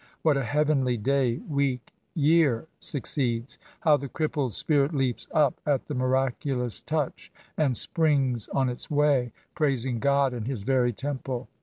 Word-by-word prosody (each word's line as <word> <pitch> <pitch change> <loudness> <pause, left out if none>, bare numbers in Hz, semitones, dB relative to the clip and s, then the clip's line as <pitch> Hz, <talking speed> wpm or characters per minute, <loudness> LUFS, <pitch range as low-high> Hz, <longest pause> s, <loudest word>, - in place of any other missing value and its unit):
What 155 -3 +4
a 135 - 0
heavenly 140 -2 +1
day, 125 +1 +1
week, 140 -4 -1 0.2
year, 150 -5 +3
succeeds! 125 -4 -2 0.2
How 155 -3 +5
the 140 -1 -6
crippled 150 -6 -1
spirit 150 0 +2
leaps 130 -3 -1
up 150 -5 +2
at 145 -5 0
the 150 - -5
miraculous 130 -1 0
touch, 150 -3 -3 0.2
and 135 -6 +1
springs 140 - +1
on 135 -1 0
its 125 -1 -5
way, 145 -5 +2 0.2
praising 130 -6 0
God 140 0 +2
in 115 -3 -4
his 125 -5 -4
very 125 0 +2
temple 130 0 -5
135 Hz, 145 wpm, -26 LUFS, 125-145 Hz, 0.2 s, How